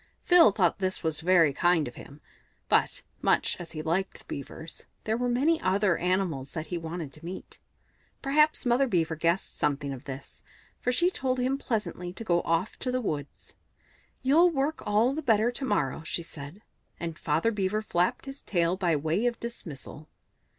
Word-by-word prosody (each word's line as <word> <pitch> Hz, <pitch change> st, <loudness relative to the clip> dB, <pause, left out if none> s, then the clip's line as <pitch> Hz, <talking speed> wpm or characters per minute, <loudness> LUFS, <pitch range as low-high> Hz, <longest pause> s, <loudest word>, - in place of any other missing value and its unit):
Phil 350 Hz, -, +8 dB
thought 190 Hz, -3 st, +1 dB
this 190 Hz, -1 st, 0 dB, 0.2 s
very 165 Hz, -3 st, +4 dB
kind 175 Hz, -1 st, +2 dB
of 120 Hz, -, -8 dB
him; 145 Hz, +4 st, -12 dB, 0.5 s
but, -, -, +2 dB, 0.2 s
much -, -, +2 dB
as 175 Hz, -2 st, -8 dB
he 155 Hz, -1 st, -5 dB
liked 175 Hz, +5 st, -1 dB
the -, -, -19 dB
Beavers, 160 Hz, +4 st, -8 dB, 0.2 s
there 220 Hz, -, 0 dB
were 245 Hz, +1 st, 0 dB
many 290 Hz, +7 st, +2 dB
other 190 Hz, -1 st, +2 dB
animals 175 Hz, -7 st, -1 dB
that 160 Hz, -2 st, -4 dB
he 175 Hz, +3 st, -3 dB
wanted 165 Hz, -3 st, -6 dB
to 155 Hz, -, -14 dB
meet. 180 Hz, +3 st, -8 dB, 0.6 s
Perhaps 300 Hz, +2 st, +2 dB
Mother 245 Hz, +3 st, +3 dB
Beaver 165 Hz, -7 st, +1 dB
guessed 170 Hz, +4 st, 0 dB
something 140 Hz, -1 st, 0 dB
of 130 Hz, -, -10 dB
this, 135 Hz, 0 st, -8 dB, 0.4 s
for 250 Hz, -, 0 dB
she 345 Hz, +8 st, +2 dB
told 260 Hz, -6 st, -1 dB
him 255 Hz, +2 st, +1 dB
pleasantly 210 Hz, -8 st, -3 dB
to 225 Hz, -, -7 dB
go 175 Hz, -5 st, +2 dB
off 165 Hz, +5 st, -1 dB
to 255 Hz, -, -2 dB
the 255 Hz, -, 0 dB
woods. 150 Hz, -, -5 dB, 0.7 s
"You'll 315 Hz, +7 st, +5 dB
work 295 Hz, 0 st, -1 dB
all 215 Hz, +5 st, +3 dB
the 310 Hz, -, -3 dB
better 230 Hz, -3 st, +3 dB
to 265 Hz, +2 st, -4 dB
morrow," 145 Hz, -, 0 dB
she 170 Hz, +1 st, -3 dB
said; 165 Hz, +5 st, -10 dB, 0.4 s
and 165 Hz, -1 st, -4 dB
Father 160 Hz, +9 st, +1 dB
Beaver 210 Hz, 0 st, -1 dB
flapped 180 Hz, +1 st, 0 dB
his 270 Hz, 0 st, -8 dB
tail 175 Hz, -2 st, +1 dB
by 175 Hz, -4 st, +1 dB
way 160 Hz, +10 st, 0 dB
of 240 Hz, -1 st, -2 dB
dismissal. 155 Hz, -, -8 dB
185 Hz, 180 wpm, -28 LUFS, 160-245 Hz, 0.7 s, Phil